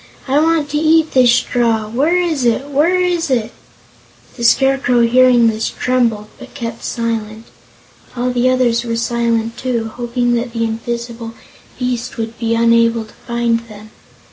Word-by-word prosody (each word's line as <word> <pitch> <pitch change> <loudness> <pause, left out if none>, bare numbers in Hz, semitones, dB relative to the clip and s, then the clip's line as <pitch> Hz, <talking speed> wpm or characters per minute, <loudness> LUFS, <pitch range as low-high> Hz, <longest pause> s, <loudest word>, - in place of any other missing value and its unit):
I 275 +2 +2
want 320 -2 +1
to 295 - 0
eat 320 0 +3
this 250 -2 +5
straw! 230 -3 +1
Where 285 +11 +1
is 325 -7 -1
it? 245 +4 0
Where 325 +6 +2
is 350 -3 0
it?" 235 -3 0 0.8
The 235 - -7
Scarecrow, 265 0 +3
hearing 245 0 +4
this, 225 -1 0
trembled 235 -4 0
but - - -13
kept 230 -4 -6
silent. 225 -2 -4 0.7
All 250 +1 -1
the 245 +1 +1
others 245 -2 +1
were 230 -1 -3
silent, 230 0 -1
too, 235 -3 -2
hoping 240 0 -1
that 235 0 -2
the 230 -1 -1
invisible 230 0 -5 0.4
beast 250 -1 -3
would 225 0 -5
be 230 -1 0
unable 230 0 +2
to 215 - -19
find 235 -1 0
them. 215 0 -13
235 Hz, 155 wpm, -16 LUFS, 230-255 Hz, 0.8 s, this